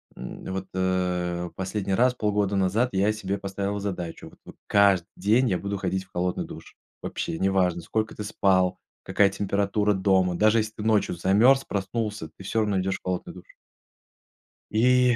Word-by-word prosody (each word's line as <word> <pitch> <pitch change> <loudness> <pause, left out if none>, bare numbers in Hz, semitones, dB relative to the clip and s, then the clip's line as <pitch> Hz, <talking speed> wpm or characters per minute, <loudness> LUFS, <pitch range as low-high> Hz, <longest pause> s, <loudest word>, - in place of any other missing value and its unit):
м, 65 - -8
вот, 95 0 -4
э, 90 -2 -1
последний 95 +1 -2
раз 125 +5 +3
полгода 105 -3 0
назад 100 +6 +2
я 100 +3 +2
себе 100 -2 -3
поставил 100 +1 -3
задачу. 90 -4 -5
Вот - - -21
вот - - -12
каждый 100 -4 +4
день 110 +7 +2
я 90 -3 0
буду 100 0 -3
ходить 95 0 -2
в - - -34
холодный 90 0 -1
душ. - - -11 0.3
Вообще, 80 - -3
неважно, 95 -2 +1
сколько 110 +6 -2
ты 105 - -5
спал, 95 -3 +1 0.2
какая 100 -1 +3
температура 100 +1 0
дома. 95 -2 +2
Даже 110 +4 +4
если 110 0 -2
ты 105 - -5
ночью 110 -4 +2
замерз, 110 +10 +4
проснулся, 100 -3 -3
ты - - -12
всё 110 +4 0
равно 105 -3 +1
идешь 95 +1 -1
в - - -54
холодный 90 -1 -3
душ. - - -15 1.2
И 125 +2 +4
100 Hz, 170 wpm, -25 LUFS, 95-105 Hz, 1.2 s, каждый